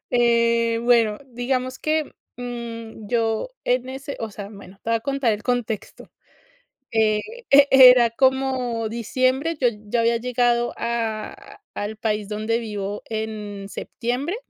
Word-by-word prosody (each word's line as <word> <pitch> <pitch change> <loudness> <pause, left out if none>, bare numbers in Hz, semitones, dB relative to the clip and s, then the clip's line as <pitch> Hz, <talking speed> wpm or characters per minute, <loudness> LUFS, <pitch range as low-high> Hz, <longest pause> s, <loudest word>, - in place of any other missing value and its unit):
Eh, 235 -1 +3
bueno, 230 -3 +3
digamos 255 +1 -2
que, 310 -1 -1 0.2
mm, 235 -3 -7
yo 225 - 0
en 250 +1 0
ese 270 +2 -6
o 225 -1 -4
sea, 200 0 -8
bueno, 200 -2 -13
te 230 - -3
voy 230 - +3
a - - -4
contar 275 -2 0
el 210 0 -4
contexto, 240 -3 -3 0.8
eh, 215 -1 +3 0.3
e 280 0 +7
era 250 -3 +8
como 260 -2 +1
diciembre, 255 +7 0
yo 250 - +4 0.2
ya 235 +3 +1
había 230 0 +2
llegado 240 0 +1
a 225 -2 -4
al 210 +1 -4
país 210 -2 -2
donde 215 +2 -1
vivo 205 -3 -5
en 215 -2 -5
septiembre. 250 - -3
235 Hz, 135 wpm, -23 LUFS, 220-250 Hz, 0.8 s, era